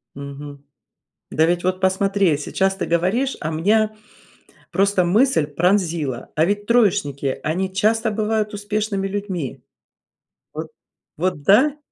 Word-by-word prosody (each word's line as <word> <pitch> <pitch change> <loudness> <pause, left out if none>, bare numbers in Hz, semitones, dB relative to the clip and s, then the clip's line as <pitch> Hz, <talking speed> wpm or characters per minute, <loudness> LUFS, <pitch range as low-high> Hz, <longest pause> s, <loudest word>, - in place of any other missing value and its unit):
Мгм. 140 0 -9 0.7
Да 160 - +3
ведь 175 +1 0
вот 185 +1 -1
посмотри, 190 -3 +2
сейчас 190 +6 0
ты 195 - -3
говоришь, 185 +11 0
а 155 - -3
меня 215 +7 +1 0.8
просто 195 -1 +2
мысль 210 - +3
пронзила, 165 - 0
а 155 +2 +3
ведь 205 +2 -1
троечники, 195 - +1
они 185 +5 -1
часто 220 +3 +1
бывают 215 0 -1
успешными 205 -1 -2
людьми. 190 - -4 0.9
Вот 155 +1 -5 0.5
вот 180 -2 -1
да? 265 - +4
190 Hz, 120 wpm, -21 LUFS, 160-210 Hz, 0.9 s, да